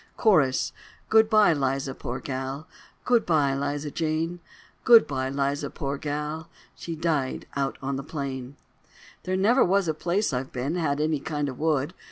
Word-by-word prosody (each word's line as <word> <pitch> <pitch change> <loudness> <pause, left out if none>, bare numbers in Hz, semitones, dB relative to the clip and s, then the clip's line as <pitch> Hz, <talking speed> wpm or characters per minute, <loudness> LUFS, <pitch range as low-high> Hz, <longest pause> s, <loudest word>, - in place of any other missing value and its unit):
Cho: 205 -8 +7 0.7
Goodbye, 215 -4 +5
Liza, 135 -1 -1
poor - - -5
gal, 135 +2 -5 0.4
Goodbye, 160 - +3
Liza 145 +2 -2
Jane, 165 +2 -1 0.4
Goodbye, 145 - +5
Liza, 140 +1 -1
poor 140 -2 -4
gal, 150 +2 -4 0.2
She 165 - -6
died 155 -5 -1
on 135 0 -2
the 135 - -5
plain. 135 -3 -5 0.7
There 185 0 0
never 225 +7 +4
was 195 0 +2
a 160 - +1
place 175 +4 -1
I've 130 +1 -3
been 130 +5 -2
Had 155 -5 0
any 155 -1 +1
kind 145 0 -2
of 130 - -8
wood. 155 0 0
150 Hz, 145 wpm, -26 LUFS, 135-170 Hz, 0.7 s, Cho